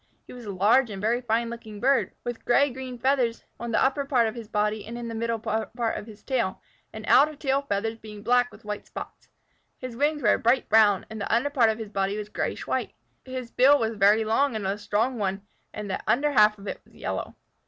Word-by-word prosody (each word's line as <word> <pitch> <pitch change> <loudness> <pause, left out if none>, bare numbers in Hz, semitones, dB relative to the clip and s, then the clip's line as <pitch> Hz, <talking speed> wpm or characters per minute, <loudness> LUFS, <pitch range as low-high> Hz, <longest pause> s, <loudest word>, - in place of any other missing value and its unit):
He - - -12
was 245 -2 -10
a 205 - -4
large 215 +7 +3
and 200 -2 -6
very 230 +4 +1
fine 235 0 0
looking 220 -3 -9
bird, 270 +3 +2
with 240 -1 -5
green 275 +2 +3
gray 255 -1 -7
feathers 250 -2 +1 0.2
on 235 0 -4
the - - +2
upper 275 +2 +1
part 255 -5 +2
of 220 - -3
his 230 -3 -8
body 210 0 -1
and 235 +2 -7
in 240 -1 -5
the 230 - -5
middle 230 0 -2
of 225 0 -2
his 215 -2 -13
tail, 235 -8 -1 0.3
the 220 -1 -8
outer 295 +6 +5
tail 275 -1 0
feathers 220 +3 -1
being 210 -1 -10
black 245 +2 +3
with - - -16
white 210 0 -5
spots. - - -9 0.5
His 255 -2 -7
wings 295 +2 0
were 210 - +5
a - - 0
bright 240 +3 +2
brown, 210 -3 +5
and 220 -1 -6
the - - -3
under 245 +5 +2
part 245 -6 +4
of 220 - -1
his 220 -2 -7
body 195 0 -1
was 210 -1 -5
grayish - - -3
white. - - -2 0.3
His 255 -2 -6
bill 275 +3 +6
was 225 -4 0
a - - -8
very 205 +2 +4
long 240 +4 +2
and 200 -1 -2
strong 220 +4 0
one, 195 -1 -2 0.3
and 210 -1 -6
the 190 - -2
under 290 +4 +2
half 210 -4 +5
of 200 - -13
it - - -5
was - - -24
yellow. - - -4
230 Hz, 235 wpm, -26 LUFS, 210-255 Hz, 0.5 s, bill